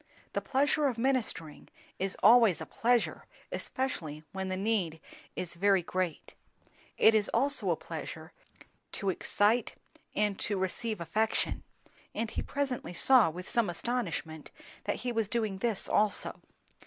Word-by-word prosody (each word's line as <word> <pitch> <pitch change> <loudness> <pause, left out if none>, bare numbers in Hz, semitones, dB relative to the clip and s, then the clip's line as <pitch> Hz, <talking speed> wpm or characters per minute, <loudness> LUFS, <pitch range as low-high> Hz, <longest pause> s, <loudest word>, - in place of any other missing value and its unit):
The - - 0
pleasure 285 +2 +2
of 250 -4 -2
ministering 230 - -1 0.3
is 190 +1 -1
always 225 -3 +7
a - - -5
pleasure, 240 0 0 0.2
especially 160 - -3
when 190 0 -4
the 185 - -2
need 190 -6 0 0.4
is 175 - -4
very 195 +1 +3
great; 180 -2 -3 0.6
it 225 - +6
is 215 -2 +2
also 280 +1 +2
a - - +3
pleasure - - -7 0.6
to 195 -1 0
excite 210 +5 +1 0.4
and 210 -2 +1
to 205 - -1
receive 190 +2 -2
affection; 215 +7 0 0.5
and 225 -1 -2
he - - -2
presently 265 -10 -3
saw, 255 -5 +6
with 180 +3 -8
some 230 -5 +1
astonishment, 170 -6 -3 0.4
that - - -2
he 245 - 0
was 225 -3 0
doing 215 -5 -1
this 225 -2 +1
also. 210 -1 +1
210 Hz, 140 wpm, -31 LUFS, 185-240 Hz, 0.6 s, always